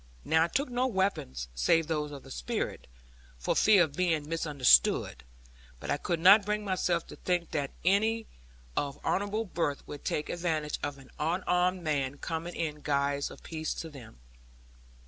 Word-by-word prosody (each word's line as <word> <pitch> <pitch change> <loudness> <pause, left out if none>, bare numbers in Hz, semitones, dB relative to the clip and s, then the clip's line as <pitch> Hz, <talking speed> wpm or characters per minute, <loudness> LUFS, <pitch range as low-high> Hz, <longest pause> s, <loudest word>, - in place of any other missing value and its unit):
Now 160 0 +4
I - - -2
took 275 +11 -1
no 250 +1 0
weapons, 190 - -1
save 165 - +3
those 150 -2 -2
of 140 -2 -9
the - - -12
Spirit, - - -3 0.5
for - - -1
fear 205 -4 +6
of 155 -4 -3
being 165 -4 +1
misunderstood. 145 - +3 0.6
But - - -4
I - - +2
could 170 +3 -2
not 195 +5 +8
bring 210 +1 -2
myself 180 -3 0
to - - -11
think 175 -2 -1
that 145 -3 -1 0.2
any 220 +4 +2 0.5
of 140 -1 -2
honourable 205 +3 0
birth 165 -6 -2
would 145 - -8
take 150 - -1
advantage 160 -4 -1
of 145 -1 -3
an 135 -1 -16
unarmed 180 +2 +1
man 140 -3 -1
coming 165 +2 -4
in 150 -2 -3
guise 140 -1 0
of - - -13
peace 160 -1 -4
to 165 - -6
them. 125 - -12
165 Hz, 165 wpm, -30 LUFS, 145-185 Hz, 0.6 s, not